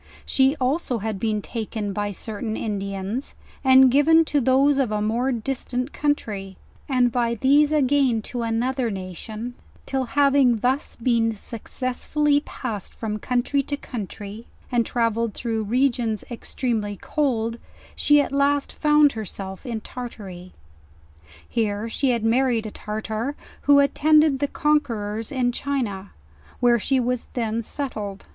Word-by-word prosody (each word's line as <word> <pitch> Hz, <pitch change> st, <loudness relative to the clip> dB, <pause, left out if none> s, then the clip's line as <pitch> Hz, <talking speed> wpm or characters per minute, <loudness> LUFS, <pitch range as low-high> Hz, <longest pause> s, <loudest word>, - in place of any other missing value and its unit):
She 265 Hz, +2 st, +3 dB
also 260 Hz, -1 st, 0 dB
had 215 Hz, -2 st, -3 dB
been 215 Hz, -1 st, -1 dB
taken 220 Hz, -3 st, -4 dB
by 205 Hz, +1 st, -1 dB
certain 220 Hz, +2 st, -4 dB
Indians, 200 Hz, +3 st, -3 dB, 0.3 s
and 260 Hz, -1 st, +7 dB
given 320 Hz, +4 st, +5 dB
to 290 Hz, -2 st, +1 dB
those 270 Hz, +3 st, +4 dB
of 255 Hz, -5 st, +1 dB
a 210 Hz, -, 0 dB
more 230 Hz, +5 st, 0 dB
distant 250 Hz, +2 st, -3 dB
country; 205 Hz, -10 st, -2 dB, 0.3 s
and 250 Hz, -2 st, +3 dB
by 235 Hz, -1 st, +1 dB
these 285 Hz, +6 st, +4 dB
again 270 Hz, -6 st, +2 dB
to 245 Hz, +1 st, -4 dB
another 235 Hz, +2 st, 0 dB
nation, 210 Hz, +5 st, -6 dB, 0.3 s
till 265 Hz, -1 st, -1 dB
having 275 Hz, -1 st, +4 dB
thus 255 Hz, +5 st, -1 dB
been 230 Hz, -2 st, +1 dB
suc 220 Hz, +2 st, -9 dB
cessively 285 Hz, +3 st, 0 dB
passed 215 Hz, -7 st, -6 dB
from 215 Hz, -2 st, -3 dB
country 250 Hz, +5 st, +1 dB
to 285 Hz, +1 st, -3 dB
country, 215 Hz, -2 st, -7 dB, 0.2 s
and 240 Hz, -2 st, +2 dB
travelled 230 Hz, -2 st, 0 dB
through 225 Hz, -2 st, -2 dB
regions 235 Hz, -2 st, +1 dB
extremely 225 Hz, -3 st, -2 dB
cold, 235 Hz, -6 st, -1 dB, 0.4 s
she 295 Hz, 0 st, +5 dB
at 285 Hz, -, 0 dB
last 280 Hz, 0 st, +1 dB
found 300 Hz, -1 st, +4 dB
herself 195 Hz, -1 st, -6 dB
in 230 Hz, -2 st, -3 dB
Tartary. 195 Hz, -8 st, -8 dB, 1.0 s
Here 215 Hz, -2 st, -1 dB
she 265 Hz, +4 st, 0 dB
had 235 Hz, -3 st, +1 dB
married 235 Hz, -1 st, +2 dB
a 215 Hz, -, -5 dB
Tartar, 220 Hz, +6 st, -4 dB, 0.3 s
who 285 Hz, 0 st, +7 dB
had 280 Hz, 0 st, +4 dB
attend 305 Hz, 0 st, +5 dB
ed 285 Hz, -4 st, +1 dB
tliQ 285 Hz, 0 st, -1 dB
conquerors 225 Hz, -8 st, 0 dB
in 250 Hz, -2 st, +1 dB
China, 235 Hz, -8 st, -3 dB, 0.5 s
where 240 Hz, -1 st, +4 dB
she 265 Hz, +4 st, +1 dB
was 250 Hz, 0 st, -1 dB
then 230 Hz, -2 st, -1 dB
settled. 215 Hz, -6 st, -4 dB
240 Hz, 140 wpm, -23 LUFS, 215-270 Hz, 1.0 s, and